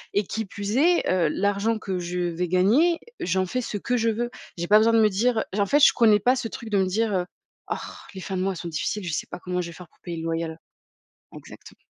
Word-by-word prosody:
et 205 Hz, -, +3 dB
qui 220 Hz, +3 st, -4 dB
plus 200 Hz, +3 st, -4 dB
est, 345 Hz, +5 st, +3 dB
heu, 180 Hz, -3 st, +2 dB
l'argent 205 Hz, +5 st, 0 dB
que 190 Hz, -4 st, -3 dB
je 175 Hz, 0 st, -4 dB
vais 175 Hz, 0 st, -1 dB
gagner, 225 Hz, -, +3 dB, 0.2 s
j'en 185 Hz, +1 st, 0 dB
fais 255 Hz, +8 st, -2 dB
ce 220 Hz, -, -4 dB
que 245 Hz, +5 st, -1 dB
je 230 Hz, -1 st, +2 dB
veux. 240 Hz, +2 st, -2 dB, 0.3 s
J'ai 170 Hz, -, -2 dB
pas 210 Hz, -, +7 dB
besoin 225 Hz, +1 st, +3 dB
de 225 Hz, -, +5 dB
me 215 Hz, -, +5 dB
dire, 225 Hz, +4 st, +1 dB
heu, -, -, +2 dB
j 205 Hz, -, -2 dB
en 200 Hz, -, +1 dB
fait 290 Hz, -, +4 dB
je -, -, +6 dB
connais 215 Hz, -3 st, +5 dB
pas 250 Hz, +6 st, +3 dB
ce 250 Hz, -3 st, -3 dB
truc 225 Hz, 0 st, -8 dB
de 205 Hz, -, +2 dB
me 190 Hz, -, +2 dB
dire, 215 Hz, +3 st, 0 dB
heu: 180 Hz, -2 st, 0 dB, 0.5 s
«Orh, -, -, -9 dB
les 190 Hz, -, -7 dB
fins 190 Hz, -, -4 dB
de 185 Hz, -, -1 dB
mois 190 Hz, 0 st, -1 dB
sont 170 Hz, -, -6 dB
difficiles, 170 Hz, +5 st, -3 dB
je 165 Hz, -, -3 dB
sais -, -, -2 dB
pas -, -, -7 dB
comment 180 Hz, 0 st, -2 dB
je 175 Hz, -, -5 dB
vais 170 Hz, -, -9 dB
faire 175 Hz, +2 st, -12 dB
pour -, -, -34 dB
payer 170 Hz, -2 st, -6 dB
le 160 Hz, -, -5 dB
loyer 165 Hz, 0 st, -1 dB
à -, -, -4 dB
la» 160 Hz, -, -8 dB, 0.8 s
exactement. -, -, -13 dB
200 Hz, 280 wpm, -25 LUFS, 180-225 Hz, 0.8 s, pas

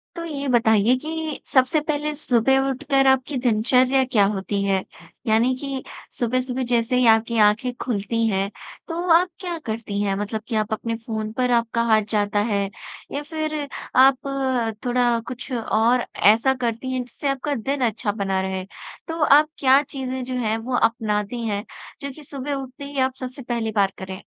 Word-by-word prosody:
तो 335 Hz, -, -5 dB
ये 285 Hz, -3 st, -4 dB
बताइए 225 Hz, -1 st, +4 dB
कि 315 Hz, -1 st, -4 dB
सबसे 260 Hz, +3 st, +3 dB
पहले 300 Hz, 0 st, -2 dB
सुबह 265 Hz, -2 st, +2 dB
उठकर 270 Hz, 0 st, +1 dB
आपकी 265 Hz, +1 st, +2 dB
दिनचर्या 250 Hz, +3 st, +3 dB
क्या 210 Hz, -5 st, +5 dB
होती 200 Hz, +1 st, -2 dB
है? 195 Hz, -1 st, +1 dB, 0.4 s
यानी 225 Hz, +4 st, +3 dB
कि 270 Hz, 0 st, -5 dB, 0.4 s
सुबह-सुबह 255 Hz, +2 st, -1 dB
जैसे 235 Hz, +1 st, +2 dB
ही 250 Hz, -, +3 dB
आपकी 225 Hz, +1 st, +3 dB
आँखें 240 Hz, +4 st, 0 dB
खुलती 230 Hz, 0 st, -1 dB
हैं, 195 Hz, -1 st, 0 dB, 0.4 s
तो 330 Hz, -, -4 dB, 0.2 s
आप 355 Hz, +2 st, +4 dB
क्या 355 Hz, -3 st, -4 dB
करती 220 Hz, -2 st, -3 dB
हैं 195 Hz, -1 st, 0 dB
मतलब 210 Hz, +2 st, -3 dB
कि, 235 Hz, -, -3 dB
आप 215 Hz, 0 st, 0 dB
अपने 230 Hz, +1 st, -2 dB
फ़ोन 220 Hz, -1 st, -4 dB
पर 250 Hz, +1 st, 0 dB
आपका 235 Hz, -1 st, +1 dB
हाथ 220 Hz, -2 st, +4 dB
जाता 205 Hz, -1 st, +1 dB
है 200 Hz, 0 st, +1 dB, 0.5 s
या 285 Hz, -, -3 dB
फ़िर 310 Hz, -1 st, -3 dB, 0.4 s
आप 260 Hz, -4 st, 0 dB
थोड़ा 245 Hz, -1 st, +2 dB
कुछ 255 Hz, +2 st, -7 dB
और 235 Hz, +1 st, +2 dB, 0.3 s
ऐसा 250 Hz, +4 st, +2 dB
करती 235 Hz, +3 st, -2 dB
हैं 255 Hz, -1 st, -1 dB
जिससे 250 Hz, +3 st, -6 dB
आपका 275 Hz, +2 st, -1 dB
दिन 270 Hz, +4 st, -2 dB
अच्छा 215 Hz, -1 st, -2 dB
बना 195 Hz, -2 st, -1 dB
रहे? 190 Hz, 0 st, -3 dB, 0.4 s
तो 325 Hz, -1 st, -4 dB
आप 300 Hz, +1 st, +6 dB
क्या 270 Hz, +1 st, +5 dB
चीज़ें 260 Hz, -2 st, -5 dB
जो 255 Hz, +1 st, -5 dB
हैं 225 Hz, -3 st, 0 dB
वो 245 Hz, +3 st, -3 dB
अपनाती 225 Hz, 0 st, 0 dB
हैं, 205 Hz, +1 st, -2 dB, 0.4 s
जो 280 Hz, 0 st, -4 dB
कि 300 Hz, +3 st, -13 dB
सुबह 280 Hz, 0 st, -5 dB
उठते 270 Hz, +1 st, -6 dB
ही 280 Hz, -1 st, -5 dB
आप 260 Hz, 0 st, +1 dB
सबसे 255 Hz, +2 st, -6 dB
पहली 235 Hz, -3 st, -2 dB
बार 200 Hz, -2 st, +3 dB
करें? 190 Hz, +1 st, -7 dB
245 Hz, 175 wpm, -23 LUFS, 220-270 Hz, 0.5 s, आप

